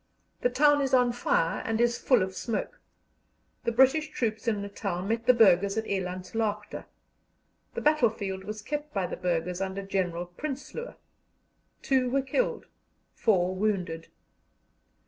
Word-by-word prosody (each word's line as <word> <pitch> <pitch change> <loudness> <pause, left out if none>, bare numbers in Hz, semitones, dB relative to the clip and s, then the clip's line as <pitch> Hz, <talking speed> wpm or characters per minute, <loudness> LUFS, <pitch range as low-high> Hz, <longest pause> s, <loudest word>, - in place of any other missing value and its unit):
The 245 - +3
town 290 +3 +4
is 270 -1 +2
on 250 -1 +4
fire 170 -8 0
and 225 0 -1
is 240 0 +2
full 250 -7 +3
of 190 0 -4
smoke. 230 - -4 0.8
The 235 - +2
British 265 +6 +4
troops 225 -6 -2
in 210 -3 0
Natal 195 -3 -4
met 225 +3 -2
the 250 - +8
Burghers 200 -2 +4
at 220 - -1
Elandslaagte. 200 +3 -3 0.9
The - - -2
battle 300 -6 +4
field 195 -3 -5
was 215 +1 -6
kept 295 +1 -5
by 195 -2 +1
the - - -4
Burghers 180 0 -2
under 195 +1 -3
General 180 -3 -1
Prinsloo. 285 - -6 0.9
Two 260 -2 +2
were 270 +2 +1
killed, - - -1 0.5
four 185 -3 +1
wounded. 185 -5 -1
215 Hz, 145 wpm, -28 LUFS, 190-255 Hz, 0.9 s, the